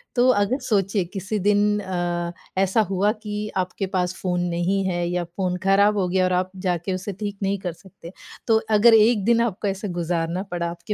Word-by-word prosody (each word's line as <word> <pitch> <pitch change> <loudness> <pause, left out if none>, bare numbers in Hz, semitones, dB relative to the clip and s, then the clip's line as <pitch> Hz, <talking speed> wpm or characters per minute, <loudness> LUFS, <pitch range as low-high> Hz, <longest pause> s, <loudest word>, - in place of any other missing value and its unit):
तो 245 +1 +4
अगर 205 +7 +1
सोचिए, 200 -4 +1
किसी 195 +3 -4
दिन 205 +1 +2
अ, 175 -2 -2 0.3
ऐसा 195 +3 +3
हुआ 195 +2 +2
कि 210 -1 -5
आपके 185 +2 -2
पास 180 -1 0
फ़ोन 180 -1 0
नहीं 175 +3 0
है 175 -2 -1
या 175 0 -1
फ़ोन 180 +1 -3
खराब 200 +2 +4
हो 185 - +1
गया 185 +1 +1
और 185 - 0
आप 185 +1 0 0.2
जाके 175 +1 -1
उसे 185 +2 -4
ठीक 205 -2 -4
नहीं 195 +1 0
कर 180 -2 -4
सकते। 180 -1 -14 0.4
तो 225 -2 +5 0.2
अगर 230 +2 +6
1 220 -1 +5
दिन 235 0 +4
आपका 210 -3 -1
ऐसा 195 +2 -4
गुज़ारना 170 +1 -1
पड़ा 170 -1 -2
आपके 170 +5 -5
195 Hz, 200 wpm, -23 LUFS, 180-210 Hz, 0.4 s, अगर